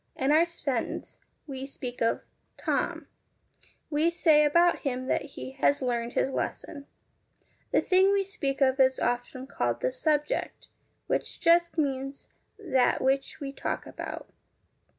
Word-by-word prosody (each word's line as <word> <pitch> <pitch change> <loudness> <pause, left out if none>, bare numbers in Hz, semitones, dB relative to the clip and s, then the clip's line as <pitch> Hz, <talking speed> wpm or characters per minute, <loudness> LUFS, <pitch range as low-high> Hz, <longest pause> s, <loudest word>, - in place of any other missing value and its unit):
In 265 +2 +1
our 325 +3 +5
sentence, 280 -8 -4 0.3
we 270 -2 -6
speak 250 -3 -7
of 230 - +1 0.2
' - - -45
Tom.' - - 0 0.9
We 305 +3 +3
say 315 -3 +4
about 340 +4 +4
him 255 -2 -3
that - - +1 0.2
he - - -6
' 270 - -20
has 285 -1 +3
learned 240 -1 -1
his 270 - +1
lesson.' 280 +2 -4 0.8
The - - +4
thing 380 +1 +4
we 400 0 +2
speak 325 -9 -3
of 265 0 +3
is 260 0 +4
often 245 +2 -2
called 270 - -2
the - - +1
SUBJECT, 305 -11 -1 0.4
which - - -2
just 340 0 +3
means 275 -2 -2 0.3
that 275 -12 +2
which 270 +3 0
we 275 -2 -5
talk - - -3
about. - - -7
280 Hz, 150 wpm, -28 LUFS, 265-335 Hz, 0.9 s, our